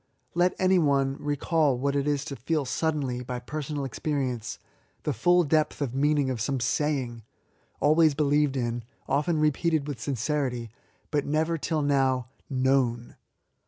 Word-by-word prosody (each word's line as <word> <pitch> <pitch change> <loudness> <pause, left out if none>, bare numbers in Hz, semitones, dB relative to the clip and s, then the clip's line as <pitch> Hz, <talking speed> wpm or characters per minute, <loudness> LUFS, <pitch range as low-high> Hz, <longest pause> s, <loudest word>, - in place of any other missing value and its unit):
Let 175 +1 +2
any 185 0 +4
one 140 -3 +2
recall 145 -1 +1
what 140 +2 0
it 140 0 0
is 145 -1 0
to 140 - -5
feel 145 +4 -1
suddenly, 140 -4 -1
by 125 0 -4
personal 145 +3 -4
experience, 130 -4 -2 0.5
the 150 - 0
66 - - -5
ESSAYS. 110 - -19
full 175 0 +5
depth 155 0 +1
of 130 - -2
meajiizig 140 0 +2
of 120 -4 -3
some 135 +3 0
sayings 130 -2 -1 0.6
always 155 0 +4
beUeved 145 -1 +2
in, 120 -2 -2 0.2
often 150 +4 +1
repeated 155 0 +1
with 140 -5 -5
sincerity^ 125 -1 -2 0.4
but 145 -2 0
never 155 +3 +1
till 155 0 -1
now 135 -3 +1 0.2
known. 130 -3 +1
140 Hz, 155 wpm, -27 LUFS, 130-150 Hz, 0.6 s, full